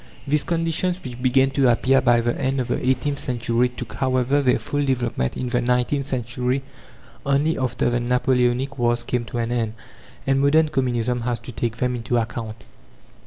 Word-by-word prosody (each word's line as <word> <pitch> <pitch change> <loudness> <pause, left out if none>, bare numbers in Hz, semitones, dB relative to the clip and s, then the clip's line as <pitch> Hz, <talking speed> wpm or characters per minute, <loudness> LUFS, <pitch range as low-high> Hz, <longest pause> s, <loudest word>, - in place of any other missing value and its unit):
These 145 +1 +1
conditions, 170 +2 0
which 125 -1 -7
began 130 +1 +3
to 135 -2 +3
appear 135 +3 +3
by 120 -1 +4
the 120 +1 0
end 135 +1 -1
of 125 -1 -2
the - - -1
eighteenth 130 +3 0
century, 120 -1 0
took, 125 -2 -8
however, 130 +1 +1
their 130 -2 +3
full 145 0 -2
development 120 - -1
in 125 - -3
the 120 0 +1
nineteenth 125 +3 0
century 125 +1 -1 0.6
only, 140 +4 +1
after 130 -2 -1
the 120 0 +1
Napoleonic 125 +2 +1
wars 120 0 +1
came 120 0 -2
to 120 - -6
an 115 0 -1
end. 115 -3 -1 0.5
And 135 0 +2
modern 155 +3 +4
Communism 125 -4 0
has 120 0 -1
to - - -8
take 115 0 -3
them 125 +1 0
into 120 +1 -1
account. 115 -1 -4
125 Hz, 180 wpm, -22 LUFS, 120-135 Hz, 0.6 s, by